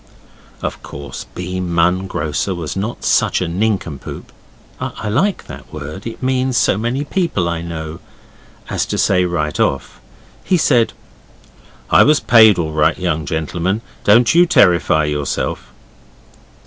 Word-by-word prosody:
Of - - -4
course 70 0 -8
B. 90 +1 -4
Munn, 90 +1 +1
grocer, 80 +3 -2
was 80 -3 -5
not 105 +5 -4
such - - +2
a 90 - -2
nincompoop 90 -5 -3 0.5
(I - - -5
like 175 - 0
that - - -11
word, 75 +7 -7
it 115 - -8
means 130 -1 0
so - - +3
many 120 +7 -2
people 155 - -1
I 85 -1 -2
know) 80 -1 -6 0.7
as - - -2
to - - -3
say 90 0 +2
right 75 -4 -2
off. 70 0 -1 0.4
He 185 - +2
said 125 -8 +2 1.0
'I - - +7
was 150 0 +4
paid 110 -4 +6
all 80 -3 -2
right, 80 +1 +2
young 80 -5 -2
gentleman. 85 +7 -2 0.2
Don't 115 +3 +5
you 175 +1 +5
terrify 85 - +4
yourself. 75 -4 -3
90 Hz, 140 wpm, -17 LUFS, 80-115 Hz, 1.0 s, I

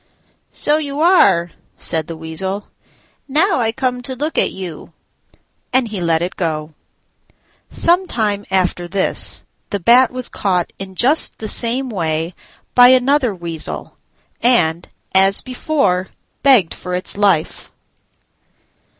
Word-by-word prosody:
"So 295 +1 +2
you 285 -1 -5
are," 245 - +4 0.3
said 160 -2 +1
the 165 - -7
Weasel, 190 +5 -5 0.6
"now 315 +5 +2
I 225 -2 +1
come 250 +1 -2
to 260 +1 -6
look 300 +5 -3
at - - +2
you"; 180 -5 -8 0.8
and 255 -2 +1
he 205 -4 -5
let 165 -1 +1
it 180 - -4
go. 155 -3 -3 1.0
Some 360 +2 +3
time 210 -6 -1
after 180 -2 0
this 190 +2 0 0.3
the 200 - -2
Bat 240 +7 +5
was 255 -1 -2
caught 180 -4 -1
in 190 -1 -8
just 270 - +2
the 220 - -6
same 245 +4 +1
way 165 -3 -2 0.4
by 245 0 +8
another 255 -2 +3
Weasel, 170 -3 -3 0.5
and, 175 -9 +2 0.2
as 195 +1 +3
before, 255 -8 -1 0.3
begged 255 -12 +4
for 180 -1 -5
its 180 - -3
life. 195 -6 0
200 Hz, 130 wpm, -17 LUFS, 175-255 Hz, 1.0 s, by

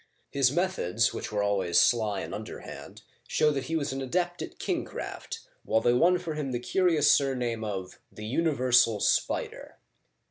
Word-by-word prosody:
His 135 -2 +3
methods, 140 - 0
which - - -5
were 105 -1 0
always 95 -4 +2
sly 110 -4 +2
and - - -6
underhand, - - -9 0.2
show 150 - +2
that 135 -3 -3
he 165 - -3
was 145 -3 -1
an 135 - -4
adept 175 +6 -1
at - - -7
kingcraft^ - - -5 0.2
while 110 - +2
they 120 +2 +2
won 175 +9 +4
for 170 -3 -5
him 150 -3 -3
the 120 - -2
curious 165 +3 +3
surname 125 -5 +1
of 95 -4 -5
the 105 - -9
universal 125 -5 +3
spider." - - -1
130 Hz, 165 wpm, -28 LUFS, 110-155 Hz, 0.2 s, won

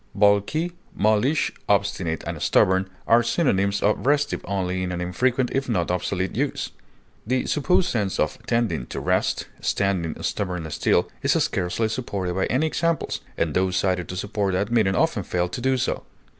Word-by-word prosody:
Balky, 105 - +3 0.2
mulish, 110 +9 +2 0.2
obstinate, 95 -5 +1
and - - -5
stubborn 95 0 +3 0.2
are 115 +1 +5
synonyms 100 - +1
of 105 +5 +1
restive 145 0 +2
only 95 -2 -1
in 90 -1 -2
an 90 - -3
infrequent 125 +8 0
if 135 -1 -1
not 90 -6 0
obsolete 90 +1 -1
use; - - -1 0.6
the 130 +1 +1
supposed 180 +5 +2
sense 105 - -1
of - - 0
"tending 115 - 0
to - - -5
rest," - - 0
"standing 95 -5 -1
stubbornly 90 -5 -2
still," - - +2
is - - +3
scarcely 95 +5 0
supported 100 -6 -3
by 95 +1 0
any 130 +6 +1
examples, 165 +1 -1 0.2
and 80 -2 0
those 95 +1 +1
cited 90 -2 0
to 90 - -4
support 100 +1 -1
that 100 +4 0
meaning 105 -5 +3
often - - +2
fail 90 0 -1
to 90 - -6
do 130 +1 +2
so. 125 - -1
100 Hz, 165 wpm, -24 LUFS, 90-125 Hz, 0.6 s, are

